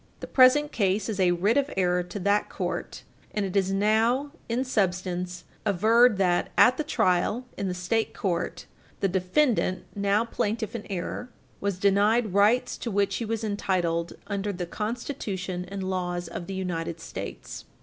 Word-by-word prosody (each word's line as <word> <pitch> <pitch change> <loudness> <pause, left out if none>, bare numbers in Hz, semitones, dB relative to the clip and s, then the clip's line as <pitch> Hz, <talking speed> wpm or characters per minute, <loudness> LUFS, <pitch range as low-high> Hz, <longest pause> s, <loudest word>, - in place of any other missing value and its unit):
The - - -6
present 280 +3 +5
case 200 -2 0
is 205 -3 -3
a 185 -1 +4
writ 190 +7 +2
of 285 0 +2
error 180 -1 +2
to 180 +3 -7
that 200 +2 +2
court, - - -4 0.3
and 210 -2 0
it 190 - -5
is 195 -1 +2
now, 225 +8 +2 0.2
in 240 +3 0
substance, 180 -6 -1 0.2
averred 220 +3 +4
that, 180 -2 +1
at 255 +1 +6
the 310 - 0
trial 210 -1 +1
in 200 - -3
the 180 - -2
State 200 +5 0
court, 180 -4 -2 0.3
the 195 - +2
defendant 190 +2 +1
(now 200 +2 +2
plaintiff 225 -2 -2
in 220 - -6
error) 195 +6 -4 0.3
was 200 -2 -1
denied 205 +2 +3
rights 210 +5 +3
to 235 - -3
which 200 -1 +1
he 235 - -3
was 225 0 -2
entitled 180 -5 -1
under 200 0 -2
the 180 -2 -4
Constitution 195 -4 -4
and 195 0 -5
laws 180 -2 -2
of 170 - -6
the 195 - -4
United 170 -3 -3
States. - - -7
200 Hz, 165 wpm, -26 LUFS, 180-225 Hz, 0.3 s, at